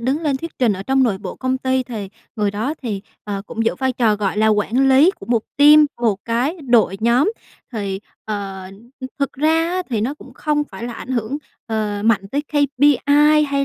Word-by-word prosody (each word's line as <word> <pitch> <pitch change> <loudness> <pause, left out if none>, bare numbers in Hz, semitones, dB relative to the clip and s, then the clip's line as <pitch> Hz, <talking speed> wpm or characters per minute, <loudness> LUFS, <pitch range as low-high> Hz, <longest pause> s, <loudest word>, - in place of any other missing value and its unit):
đứng 265 +6 0
lên 290 -4 +1
thuyết 330 +5 -8
trình 245 -4 +3
ở 190 -1 -5
trong 265 +5 +2
nội 215 -7 +1
bộ 190 -2 -7
công 260 0 -1
ty 260 0 0
thì 225 -6 -6 0.3
người 210 -2 +1
đó 220 +9 -2
thì, 210 -6 -3 0.2
ờ, 200 -1 -4
cũng 225 -1 -3
giữ 225 - +1
vai 260 0 -1
trò, 230 -4 +2
gọi 200 -1 -2
là, 215 +1 +3
quản 220 +5 +2
lý 270 +7 +6
của - - -13
một 235 -2 +1
team, 300 +1 +7
một 225 -4 +2
cái 245 +9 0
đội 235 -7 +3
nhóm. 245 - +3 0.4
Thì, 200 -4 -3 0.2
ờ, 200 -3 -5
ừm, 215 +5 -17 0.3
thực 280 -1 -1
ra 320 +3 +2
á 365 +1 -1
thì 225 -4 0
nó 250 +7 -1
cũng - - -15
không 300 -1 0
phải 235 - -9
là 240 - -5
ảnh 230 - -9
hưởng, 250 +2 -2 0.3
ờ, 215 -2 -2
mạnh 210 -3 +2
tới 285 +7 -1
KPI 290 +1 +4
hay 280 -1 0
245 Hz, 215 wpm, -20 LUFS, 215-285 Hz, 0.4 s, team